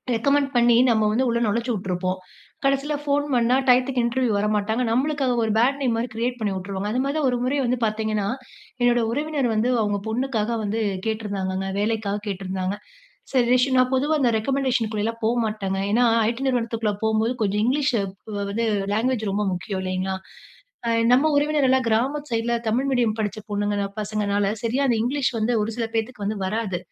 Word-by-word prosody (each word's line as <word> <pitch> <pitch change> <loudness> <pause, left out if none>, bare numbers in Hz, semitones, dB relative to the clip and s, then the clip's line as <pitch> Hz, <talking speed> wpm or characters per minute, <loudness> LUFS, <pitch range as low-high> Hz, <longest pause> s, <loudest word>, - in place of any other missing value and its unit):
Recommend 280 +4 +2
பண்ணி, 240 -1 +5
நம்ம 220 -2 +3
வந்து 250 +5 +1
உள்ள 235 0 +1
நொழச்சி 235 +4 0
விட்ருப்போம். 185 -2 -2 0.4
கடைசில 275 +2 +1
ஃபோன் 290 0 +1
பண்ணா 240 0 +3
டையத்துக்கு 255 0 +3
இன்டர்வியூ 240 0 0
வரமாட்டாங்க. 210 +2 0
நம்மளுக்கு 280 +5 0
அங்க 250 -1 +1
ஒரு 220 - 0
பேட் 265 +5 +3
நேம் 245 -4 +1
மாரி 235 +2 -1
கிரியேட் 245 +2 -1
பண்ணி 210 -3 -1
உட்ருவாங்க. 195 +2 -4
அதுமாரி 270 +5 -1
தான் 300 -3 +2
ஒரு 245 - 0
முறை 260 +3 0
வந்து 250 +1 +1
பார்த்தீங்கன்னா. 215 -1 -1 0.5
என்னோட 240 0 +4
உறவினர் 290 -1 -1
வந்து, 220 +3 +1
அவுங்க 205 -1 0
பொண்ணுக்காக 230 -1 -1
வந்து 215 +2 -1 0.3
கேட்டிருந்தாங்கங்க. 195 -3 -2
வேலைக்காக 210 -1 -1
கேட்டிருந்தாங்க. 190 0 -3 0.5
சரி 250 -3 +3
ரஷ் 255 +1 +4
நான் 255 0 +3
பொதுவா 285 +4 +1
அந்த 250 - +4
ரெக்கமண்டேஷனுக்குள்ளலா 230 -3 0
போ - - +3 0.2
மாட்டேங்க. 200 -3 -2
ஏன்னா 240 +3 +4 0.2
ஐ-டி 235 +3 -2
நிறுவனத்துக்குள்ள 230 -4 0
போம்போது 220 +2 +1
கொஞ்சம் 205 0 +1
இங்கிலீஷ் 280 +3 +2 0.4
வ்வ 210 - -4
வந்து 230 +3 -1 0.3
லேங்குவேஜ் 220 -1 0
ரொம்ப 205 +2 0
முக்கியம் 185 +2 -4
இல்லைங்களா? 185 +1 -2 0.7
அ - - +2 0.2
நம்ம 270 +5 +5
உறவினர் 290 -1 +2
எல்லாம் 260 0 +3
கிராமத் 270 +7 0
சைட்ல 230 +1 0
தமிழ் 245 +5 +1
மீடியம் 240 -5 +1
படிச்ச 215 0 -2
பொண்ணுங்கனா 205 0 -1
பசங்கனால 205 -1 0
சரியா 250 +4 0
அந்த 240 - +2
இங்கிலீஷ் 265 +2 0
வந்து 220 +2 0
ஒரு 215 +2 -2
சில 235 -1 -1
பேத்துக்கு 225 -1 -2
வந்து 210 +1 -2
வராது. 205 -2 -2
230 Hz, 170 wpm, -23 LUFS, 210-255 Hz, 0.7 s, பண்ணி